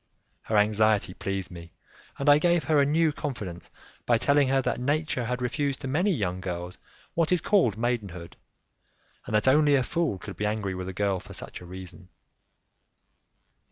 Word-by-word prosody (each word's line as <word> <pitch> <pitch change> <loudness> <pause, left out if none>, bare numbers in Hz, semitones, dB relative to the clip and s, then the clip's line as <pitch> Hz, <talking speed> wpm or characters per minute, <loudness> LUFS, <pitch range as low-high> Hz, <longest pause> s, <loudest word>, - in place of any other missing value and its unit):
Her 110 - 0
anxiety 105 -2 +3
pleased 95 -1 -4
me, 85 -1 -11 0.4
and 140 - -3
I 145 0 +7
gave 175 0 +2
her 150 +1 +3
a 140 - +3
new 160 +2 +3
confidence 105 -13 -6 0.4
by 120 - +4
telling 140 +3 +3
her 135 +1 +2
that 130 - -1
nature 145 -1 -1
had 125 +2 -2
refused 140 +2 -1
to - - -4
many 175 +10 +1
young 95 - -2
girls 90 -1 -5 0.3
what 165 0 +1
is 180 - +4
called 160 - +2
maidenhood, 100 -8 -3 0.9
and - - -1
that 105 - +2
only 145 +2 +5
a 130 - +3
fool 160 - -1
could 95 -1 -9
be 105 - -1
angry 105 -2 -2
with 95 0 -5
a - - -3
girl 100 0 0
for - - -12
such - - -8
a 90 - -11
reason. 90 -1 -9
115 Hz, 180 wpm, -27 LUFS, 95-145 Hz, 0.9 s, I